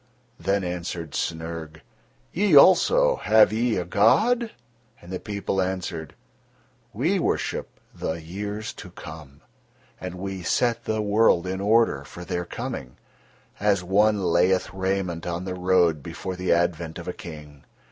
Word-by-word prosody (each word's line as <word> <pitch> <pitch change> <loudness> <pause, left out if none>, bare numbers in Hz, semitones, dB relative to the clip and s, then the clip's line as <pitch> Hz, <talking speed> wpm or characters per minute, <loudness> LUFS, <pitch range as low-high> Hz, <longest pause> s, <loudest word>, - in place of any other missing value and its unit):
Then 95 +3 0
answered 85 -2 -4
Snyrg: 80 -1 -4 0.5
"Ye 195 -2 +3
also, - - +6
have 110 -1 +5
ye 115 +1 +1
a 90 - -2
god?" 220 - +3 0.5
And 85 - -13
the 90 - -3
people 100 -2 -2
answered: 90 -4 -4 0.8
"We - - 0
worship - - -2
the - - -3
years 100 +6 -5
to - - -10
come, 75 -3 -11 0.6
and 90 -1 -6
we 95 0 -5
set 115 +7 0
the 110 -1 -1
world 105 -4 +3
in 95 +1 -3
order 105 -9 +3
for 85 +5 -10
their 90 0 -3
coming, 65 -6 -6 0.6
as 100 -3 +2
one 100 +2 +3
layeth 90 +2 +2
raiment 95 -3 -2
on 85 +1 -3
the 95 - -3
road 90 -4 +2
before 95 +6 -6
the 90 0 -1
advent 85 -1 0
of 85 - -8
a 90 - -3
King. 75 -4 -11
90 Hz, 140 wpm, -25 LUFS, 85-105 Hz, 0.8 s, also